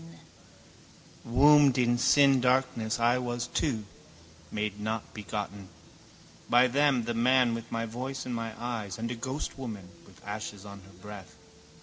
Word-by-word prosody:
Womb 165 - -13
of 165 - -15
sin. - - -20 1.1
Wombed 145 0 +6
in 120 -1 +2
sin 135 +1 +5
darkness 125 -3 +1
I 120 +2 +3
was 120 -1 -3
too, 120 -5 -2 0.7
made 105 -1 -3
not 110 +1 -4
begotten. 100 -1 -6 0.8
By 120 +1 +6
them, 135 -1 +2
the 120 +1 -2
man 125 +1 +3
with 115 0 -6
my 115 0 -2
voice 125 +4 -5
and 125 - -4
my 115 -1 -3
eyes 115 -6 -4
and 115 +1 -4
a - - -3
ghostwoman 120 -5 -5 0.2
with - - -18
ashes 105 -1 -6
on 100 -1 -10
her 95 +1 -18
breath. 105 -3 -10
120 Hz, 155 wpm, -29 LUFS, 105-130 Hz, 1.1 s, Wombed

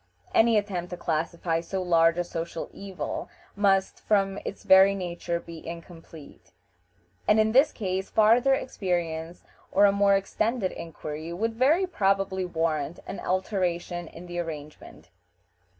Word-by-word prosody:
Any 225 -1 +5
attempt 185 -4 -2
to 180 - -6
classify 165 0 -1
so 185 +2 -3
large 165 -1 +4
a 175 - +1
social 165 -1 -5
evil 190 -5 -5 0.3
must, 195 -2 +2
from 195 -2 +1
its - - -7
very 195 0 +6
nature, 175 -2 -3
be 165 -1 -11
incomplete, 165 -2 -11 0.7
and 210 +1 +5
in 220 0 +3
this 270 +6 +5
case 190 -3 -3
farther 235 +5 +4
experience 175 -8 -3 0.3
or 200 - +5
a 200 - +6
more 200 0 +4
extended 200 +1 -1
inquiry 160 -1 -7
would 225 +6 -2
very 290 +11 +3
probably 195 - 0
warrant 160 -2 -2
an - - -6
alteration 180 -2 -2
in 175 - -11
the 175 0 -5
arrangement. 155 -3 -8
185 Hz, 135 wpm, -27 LUFS, 170-200 Hz, 0.7 s, very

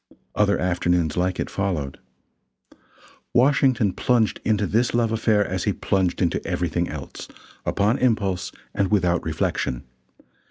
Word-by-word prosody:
Other 100 -1 +2
afternoons 90 -3 0
like 90 +1 0
it - - -1
followed. 85 -9 -3 1.4
Washington 125 -5 +3
plunged 120 -4 +1
into 105 -2 +1
this 115 +6 +1
love 115 -2 +2
affair 110 -2 +2
as 95 -1 -3
he 105 - +1
plunged 95 -2 0
into 85 - 0
everything 85 0 -1
else 70 -3 -8 0.4
upon 105 +4 +1
impulse 105 -7 0 0.2
and 100 -2 0
without 90 -4 +2
reflection. 75 -5 -2
95 Hz, 125 wpm, -23 LUFS, 90-110 Hz, 1.4 s, Washington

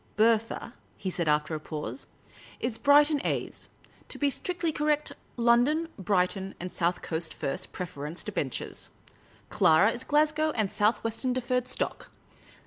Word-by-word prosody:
" - - -34
Bertha," 230 +1 +1 0.2
he 190 - -3
said, 175 -2 -2
after 150 +1 +2
a 155 - -2
pause, 155 - -6 0.3
" - - -20
is 225 -2 -9
Brighton 290 +1 +5
A's - - -3 0.2
— - - -29
to - - -6
be 285 -1 +2
strictly 345 +2 -1
correct, 300 0 0 0.3
London, 245 +8 +3
Brighton, 190 0 0
and 180 +1 -6
South 175 0 0
Coast 160 -1 -3
First 185 +7 -3
Preference 160 -2 -6
Debentures. 135 -3 -4 0.6
Clara 180 +8 +5
is 245 +2 -4
Glasgow 305 +2 +2
and 215 -4 0
South 210 +3 +2
Western 230 +3 0
Deferred 250 0 -1
Stock. - - -3
225 Hz, 150 wpm, -28 LUFS, 175-285 Hz, 0.6 s, Brighton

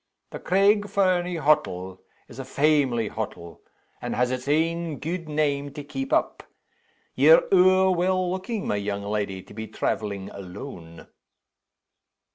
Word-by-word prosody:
The - - -7
Craig 205 +2 +2
Fernie 180 -2 +1
hottle 95 - 0 0.3
is 125 - -12
a - - -4
faimily 135 -4 +1
hottle 105 -6 -7 0.4
and - - -3
has 125 +1 +1
its 130 +1 -4
ain 165 +1 0
gude 165 +1 -5
name 145 -2 0
to 145 - -7
keep 135 -2 -5
up. - - +1 0.7
Ye're 155 +5 +6
ower 185 0 +5
well 185 0 +1
looking, 195 +3 -4
my 105 - -1
young 100 0 -3
leddy, 100 -2 -3
to - - -15
be 110 +1 -6
traveling 100 -2 -3
alone." 90 -3 -10
145 Hz, 135 wpm, -25 LUFS, 105-175 Hz, 0.7 s, Ye're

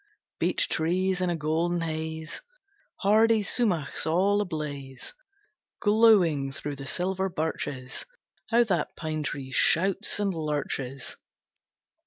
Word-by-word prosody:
Beech - - +1
trees 185 +3 0
in 180 - +1
a 175 - 0
golden 165 +3 0
haze; 160 -1 -4 0.6
Hardy 220 +2 +4
sumachs 185 - 0
all 195 +5 +3
ablaze, 145 - -6 0.7
Glowing 205 -10 +4
through 145 0 -5
the 135 0 -7
silver 190 +6 -1
birches. 150 - -4 0.4
How 235 +1 +5
that 195 -7 -1
pine 155 -1 -3
tree 140 -2 -4
shouts 190 +9 +2
and 200 -2 0
lurches! 145 -4 -3
165 Hz, 110 wpm, -27 LUFS, 150-195 Hz, 0.7 s, How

